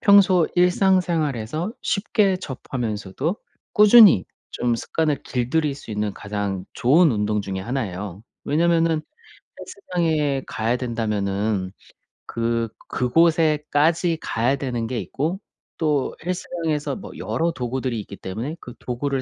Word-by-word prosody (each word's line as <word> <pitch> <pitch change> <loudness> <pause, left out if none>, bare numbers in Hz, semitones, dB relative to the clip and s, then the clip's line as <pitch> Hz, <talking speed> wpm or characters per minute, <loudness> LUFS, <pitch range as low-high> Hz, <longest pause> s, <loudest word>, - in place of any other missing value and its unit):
평소 195 -5 +5
일상생활에서 175 - +1
쉽게 200 -2 +1
접하면서도 130 - -4 0.4
꾸준히 210 - +8 0.3
쫌 120 -1 0
습관을 150 +3 -1
길들일 135 +4 0
수 135 - -11
있는 105 -1 -1
가장 100 -3 -4
좋은 155 +7 +4
운동 105 0 0
중에 95 -1 -4
1 120 +2 -2
예요. 95 +1 -7 0.2
왜냐하면은 165 +1 +2 0.6
헬스장에 160 - -1
가야 115 +3 -1
된다면은 105 -5 -1 0.5
그 115 0 -1 0.2
그곳에까지 160 +3 +2
가야 120 +5 0
되는 120 -4 -3
게 125 -2 -2
있고 165 +8 -3 0.4
또 150 -4 0
헬스장에서 170 -4 -2
뭐 200 - -9
여러 165 +1 -1
도구들이 125 -3 -3
있기 100 - -10
때문에 115 - -5
그 120 - -10
도구를 130 +2 -2
135 Hz, 275 characters per minute, -23 LUFS, 115-165 Hz, 0.6 s, 꾸준히